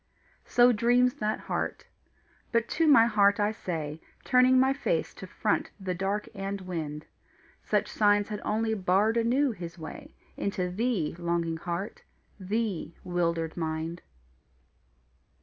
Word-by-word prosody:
So 245 0 +5
dreams 245 +2 +3
that 215 -5 -1
heart. - - -3 0.7
But 230 -1 +1
to 325 0 +1
my 275 -6 +7
heart 205 -3 +3
I 205 +1 +2
say, 160 -7 -5 0.2
Turning 255 0 +5
my 265 +1 +4
face - - -1
to - - -9
front - - -1
the 190 -2 -3
dark 195 +3 -2
and 195 0 -4
wind: 155 -5 -5 0.6
Such - - 0
signs 205 0 +2
had 210 -1 -4
only 220 +1 0
barred 200 +2 +2
anew 245 +4 +2
His 175 -4 -8
way 160 -1 -9 0.2
Into 185 -3 -2
thee, 200 -6 -1
longing 170 -1 -1
heart, 175 +4 -5 0.4
thee, 200 -3 -2
wildered 170 -2 -1
mind. 160 +1 -3
200 Hz, 130 wpm, -28 LUFS, 170-230 Hz, 0.7 s, my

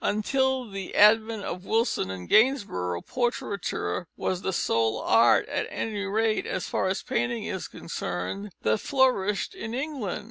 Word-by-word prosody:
Until 265 +4 +1
the 195 -2 -6
advent 220 0 +5
of 180 - -5
Wilson 225 - 0
and 90 -2 -6
Gainsborough, 200 - +2
portraiture 200 - -2
was 185 -1 -1
the 190 - -1
sole 115 -9 +1
art, - - +4
at - - -2
any 210 -2 -3
rate, 215 +2 0
as - - -3
far - - 0
as 190 +1 -1
painting 235 -2 -1
is 190 -3 -4
concerned, 165 - -5
that 110 0 +2
flourished 250 -8 +1
in 235 -11 -5
England. 265 - -3
210 Hz, 145 wpm, -27 LUFS, 180-235 Hz, -, advent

